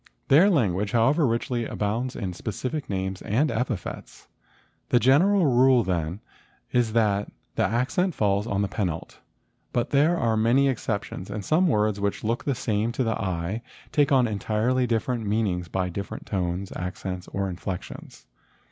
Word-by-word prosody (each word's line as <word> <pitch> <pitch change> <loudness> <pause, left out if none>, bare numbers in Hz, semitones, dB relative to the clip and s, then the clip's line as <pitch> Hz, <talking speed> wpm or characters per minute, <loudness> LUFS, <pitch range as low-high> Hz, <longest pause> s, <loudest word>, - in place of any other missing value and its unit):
Their 165 +9 +7
language, 105 - +1
however, 135 +6 +3
richly 120 +1 -1
abounds 115 +5 -2
in 95 -5 -4
specific 130 - -4
names 95 -1 -3
and 135 +9 +1
epithets. 115 -4 -4 0.6
The 120 - +4
general 170 - +4
rule, 130 -2 +5
then, 90 +1 -2 0.5
is 120 -3 +1
that 105 -3 +1 0.2
the - - +1
accent 130 - 0
falls 100 0 +1
on 100 -2 0
the - - 0
penult; 90 -6 -4 0.5
but 120 0 -1
there 150 +5 +4
are 115 -6 +1
many 120 +5 +3
exceptions 105 -6 -3
and 100 -1 -5
some 175 +4 +3
words 105 - +1
which 100 0 -2
look 115 +3 -1
the 140 - 0
same 110 -1 -1
to 130 - 0
the 115 -1 -1
eye 95 +3 -2 0.3
take 145 -2 +2
on 130 -3 +4
entirely 110 +4 0
different 115 -1 -1
meanings 100 -5 0
by 90 +1 -1
different 100 +2 -6
tones, 95 -1 -2
accents, 90 0 -5
or 100 0 -2
inflections. 90 0 -7
110 Hz, 155 wpm, -25 LUFS, 100-130 Hz, 0.6 s, Their